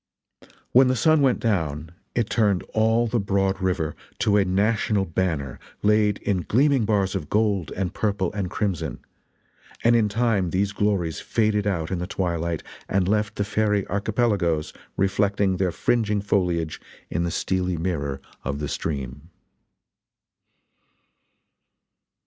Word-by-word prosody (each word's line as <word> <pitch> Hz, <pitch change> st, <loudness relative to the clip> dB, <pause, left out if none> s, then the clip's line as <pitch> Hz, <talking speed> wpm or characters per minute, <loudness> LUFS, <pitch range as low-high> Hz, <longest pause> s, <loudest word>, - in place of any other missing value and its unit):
When 130 Hz, +1 st, +6 dB
the 130 Hz, -, +2 dB
sun 155 Hz, +4 st, +4 dB
went 130 Hz, -3 st, +3 dB
down 80 Hz, -8 st, -1 dB, 0.2 s
it 120 Hz, -3 st, +1 dB
turned 105 Hz, -6 st, +2 dB
all 110 Hz, +2 st, +3 dB
the 120 Hz, +1 st, 0 dB
broad 95 Hz, -1 st, 0 dB
river 90 Hz, -5 st, -1 dB, 0.3 s
to 105 Hz, -, +3 dB
a 100 Hz, -, +4 dB
national 100 Hz, +1 st, +1 dB
banner 80 Hz, -7 st, -2 dB, 0.2 s
laid 105 Hz, -1 st, +3 dB
in 95 Hz, -3 st, 0 dB
gleaming 130 Hz, -, +2 dB
bars 100 Hz, -3 st, +1 dB
of 75 Hz, -, -4 dB
gold 100 Hz, -6 st, +1 dB
and 95 Hz, -1 st, -2 dB
purple 100 Hz, -4 st, -1 dB
and 100 Hz, -3 st, -2 dB
crimson; 100 Hz, -5 st, -2 dB, 0.9 s
and 120 Hz, +1 st, +5 dB
in 110 Hz, -3 st, +3 dB
time 105 Hz, -4 st, +1 dB
these 100 Hz, +3 st, 0 dB
glories 100 Hz, -6 st, 0 dB
faded 105 Hz, -2 st, 0 dB
out 85 Hz, -5 st, -1 dB
in 95 Hz, -, -1 dB
the 90 Hz, -, -3 dB
twilight 85 Hz, -4 st, -2 dB, 0.3 s
and 95 Hz, -2 st, +1 dB
left 105 Hz, +1 st, 0 dB
the 100 Hz, -, 0 dB
fairy 105 Hz, -1 st, +1 dB
archipelagoes 100 Hz, -6 st, 0 dB, 0.2 s
reflecting 95 Hz, 0 st, +1 dB
their 90 Hz, -1 st, +1 dB
fringing 105 Hz, +2 st, +1 dB
foliage 90 Hz, -5 st, 0 dB, 0.3 s
in -, -, 0 dB
the 85 Hz, -, 0 dB
steely 90 Hz, +1 st, -1 dB
mirror 70 Hz, -5 st, -2 dB, 0.2 s
of 70 Hz, +2 st, -2 dB
the 75 Hz, 0 st, -3 dB
stream. 70 Hz, 0 st, -4 dB
100 Hz, 135 wpm, -24 LUFS, 85-105 Hz, 0.9 s, When